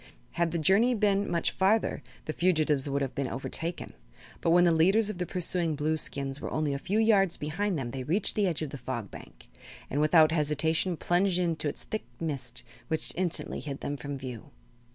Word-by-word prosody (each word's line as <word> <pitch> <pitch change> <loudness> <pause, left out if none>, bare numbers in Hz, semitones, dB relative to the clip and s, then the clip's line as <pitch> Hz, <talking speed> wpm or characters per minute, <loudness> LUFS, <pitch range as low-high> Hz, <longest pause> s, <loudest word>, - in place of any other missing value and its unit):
Had 170 0 +1
the 170 - -2
journey 200 +10 +4
been 205 -2 +2
much 170 -1 0
farther 200 -3 +1 0.2
the 155 - -3
fugitives 155 -6 +2
would 140 0 0
have 135 - -3
been 140 -1 -2
overtaken, 165 +6 -4 0.5
but - - +1
when 175 +1 +6
the 175 - +5
leaders 195 +7 +4
of 185 - -9
the 180 - -2
pursuing 175 -2 -1
Blueskins 145 -2 -2
were - - -4
only 155 -2 -1
a 140 - -3
few 195 +8 -1
yards 205 -5 +3
behind 175 +5 -1
them 120 -4 -4
they 135 - -4
reached 180 +10 0
the 205 -2 +2
edge 165 -3 -2
of 145 - -5
the 140 - -7
Fog 120 -5 -5
Bank - - -12 0.4
and 145 - +1
without 155 0 +6
hesitation 160 +3 +1
plunged 180 +2 +2
into 170 -4 0
its - - -6
thick 215 - -5
mist, 125 -6 -3 0.2
which 160 - +1
instantly 180 -2 -2
hid 140 -2 -6
them 145 - -3
from 145 0 -5
view. 130 -1 -8
160 Hz, 195 wpm, -29 LUFS, 145-185 Hz, 0.5 s, when